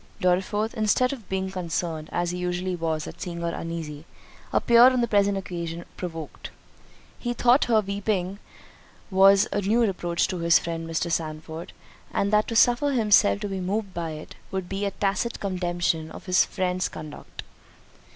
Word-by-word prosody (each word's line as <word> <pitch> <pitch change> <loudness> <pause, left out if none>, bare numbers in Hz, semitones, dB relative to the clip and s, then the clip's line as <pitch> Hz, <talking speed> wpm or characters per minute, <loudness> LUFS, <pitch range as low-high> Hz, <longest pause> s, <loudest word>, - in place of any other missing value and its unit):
Dorriforth, 200 +4 +1
instead 250 +3 +2
of 235 -8 -10
being 190 0 -2
concerned, 165 -3 -3
as 175 0 -1
he 180 - -4
usually 180 +1 -2
was 160 -2 -2
at - - -10
seeing 170 -2 -5
her 170 0 -2
uneasy, 160 -3 -5 0.5
appeared 240 +2 +6
on 250 - +1
the 235 - +1
present 200 -2 +2
occasion 170 -3 -5
provoked. 165 -4 -7 0.7
He 240 -1 -3
thought 245 +4 +4
her 225 -3 +3
weeping 200 -1 -2 0.7
was 195 +1 +6
a 205 - 0
new 215 +5 +2
reproach 180 -5 0
to 180 - -3
his 170 -1 +5
friend 165 -1 -4
Mr. 165 +1 -1
Sandford, 160 +1 -4 0.4
and 200 +1 0
that 210 0 +4
to 230 - -3
suffer 245 +5 +4
himself 210 -3 +4
to 205 - -2
be 195 -1 -4
moved 195 +2 -2
by 165 -2 -3
it, 155 0 -9 0.2
would 190 -2 -3
be 195 +2 -3
a - - +1
tacit 200 +4 -1
condemnation 175 -4 -1
of - - -11
his 185 0 +4
friend's 185 -1 -1
conduct. 155 -2 -9
185 Hz, 170 wpm, -25 LUFS, 170-205 Hz, 0.7 s, appeared